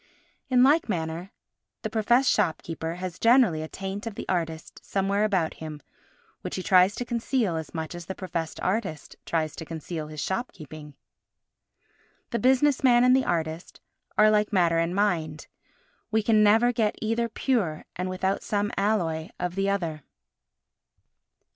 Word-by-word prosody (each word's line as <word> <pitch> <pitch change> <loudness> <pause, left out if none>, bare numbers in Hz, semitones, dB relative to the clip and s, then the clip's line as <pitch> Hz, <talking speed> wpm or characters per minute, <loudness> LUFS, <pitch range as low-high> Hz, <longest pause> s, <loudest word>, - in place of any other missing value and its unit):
In 250 -1 +5
like 295 +1 +4
manner, 165 0 -3 0.5
the - - -2
professed 240 +4 +3
shopkeeper 165 0 -1
has 180 0 -6
generally 230 -9 +4
a 155 - -4
taint 195 +5 -6
of 220 - -5
the - - -7
artist 165 -3 -3
somewhere 200 +1 0
about 190 -7 +1
him 155 -2 -6 0.6
which - - -5
he 185 - -4
tries 185 +2 +5
to 245 - -4
conceal 235 -5 0
as 160 -1 -5
much 160 0 -4
as 175 -1 -8
the 190 - -4
professed 165 -4 -4
artist 185 -6 -2
tries 160 -2 -1
to - - -5
conceal 160 0 -6
his 155 0 -8
shopkeeping. 155 - -5 1.4
The 235 - 0
business 265 +2 +3
man 245 -2 +6
and 250 +1 +6
the 265 - +2
artist 160 0 -3 0.4
are 215 0 +6
like 210 0 +2
matter 170 -4 +3
and 165 +2 0
mind. 165 -7 0 0.6
We 220 -1 +1
can 215 -1 +4
never 225 +4 +5
get 220 -3 +1
either 230 +1 -1
pure 215 - -1
and 180 +1 -3
without 190 +1 -1
some 205 0 -1
alloy 175 -6 0
of 180 -1 -2
the 195 +1 0
other. 170 -6 -2
190 Hz, 155 wpm, -26 LUFS, 165-220 Hz, 1.4 s, man